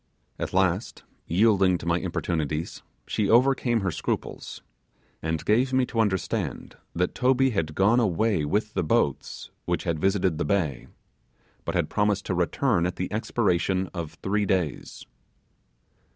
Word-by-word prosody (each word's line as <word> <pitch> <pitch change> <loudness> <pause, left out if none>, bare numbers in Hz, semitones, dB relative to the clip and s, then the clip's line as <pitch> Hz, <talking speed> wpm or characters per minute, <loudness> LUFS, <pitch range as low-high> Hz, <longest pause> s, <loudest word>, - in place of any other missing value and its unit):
At - - -3
last, 95 +2 0 0.2
yielding 95 -1 +3
to - - -10
my 85 +1 +1
importunities, 80 -1 -3 0.2
she 105 -2 -1
overcame 120 -1 +3
her 95 -2 0
scruples, - - -4 0.6
and 80 0 -2
gave 125 +5 +2
me 130 -1 +3
to 115 - -4
understand 100 -4 -1 0.2
that 90 +1 0
Toby 130 +1 +3
had 80 -8 -2
gone 105 +6 +4
away 105 -4 +1
with 105 +8 -1
the - - 0
boats 75 -3 -1
which - - -1
had 80 -2 -1
visited 95 -4 +1
the - - +1
bay, 80 -11 -1 0.8
but - - -3
had - - +1
promised 105 -1 0
to - - -1
return 90 +2 +1
at 90 - -4
the 90 +2 -4
expiration 95 -4 0
of 85 -4 -5
three 100 +1 0
days. 90 -7 -2
95 Hz, 145 wpm, -26 LUFS, 85-110 Hz, 0.8 s, gone